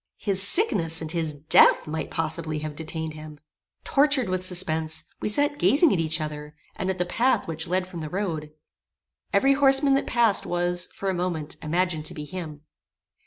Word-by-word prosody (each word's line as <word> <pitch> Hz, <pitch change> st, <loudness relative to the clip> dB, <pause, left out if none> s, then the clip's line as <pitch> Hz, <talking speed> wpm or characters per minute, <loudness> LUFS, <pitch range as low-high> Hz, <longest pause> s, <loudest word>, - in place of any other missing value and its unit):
His 195 Hz, -2 st, 0 dB
sickness 190 Hz, -, +3 dB
and 160 Hz, -1 st, -5 dB
his 165 Hz, -2 st, -2 dB
death 145 Hz, +1 st, +4 dB
might 155 Hz, 0 st, -4 dB
possibly 160 Hz, -1 st, -2 dB
have 150 Hz, -1 st, -6 dB
detained 160 Hz, 0 st, -5 dB
him. 155 Hz, -1 st, -11 dB, 0.4 s
Tortured 280 Hz, -6 st, +2 dB
with 185 Hz, 0 st, -2 dB
suspense, 160 Hz, -4 st, 0 dB, 0.2 s
we -, -, -1 dB
sat 290 Hz, +6 st, +1 dB
gazing 295 Hz, +2 st, +4 dB
at 185 Hz, -, 0 dB
each 160 Hz, 0 st, 0 dB
other, 150 Hz, -1 st, -6 dB, 0.2 s
and 185 Hz, -, -3 dB
at 190 Hz, -, -2 dB
the 180 Hz, -, 0 dB
path 240 Hz, +8 st, +1 dB
which 165 Hz, 0 st, -3 dB
led 185 Hz, +2 st, 0 dB
from 180 Hz, -3 st, -8 dB
the 155 Hz, -, -5 dB
road. 160 Hz, -5 st, -4 dB, 0.8 s
Every 275 Hz, +1 st, +4 dB
horseman 275 Hz, 0 st, +4 dB
that 275 Hz, -, 0 dB
passed 230 Hz, -4 st, +2 dB
was, 175 Hz, 0 st, -1 dB
for 195 Hz, -1 st, -2 dB
a -, -, -3 dB
moment, 175 Hz, -4 st, -3 dB
imagined 165 Hz, 0 st, -1 dB
to -, -, -3 dB
be 150 Hz, -, -6 dB
him. 155 Hz, -4 st, -7 dB
175 Hz, 180 wpm, -25 LUFS, 155-200 Hz, 0.8 s, death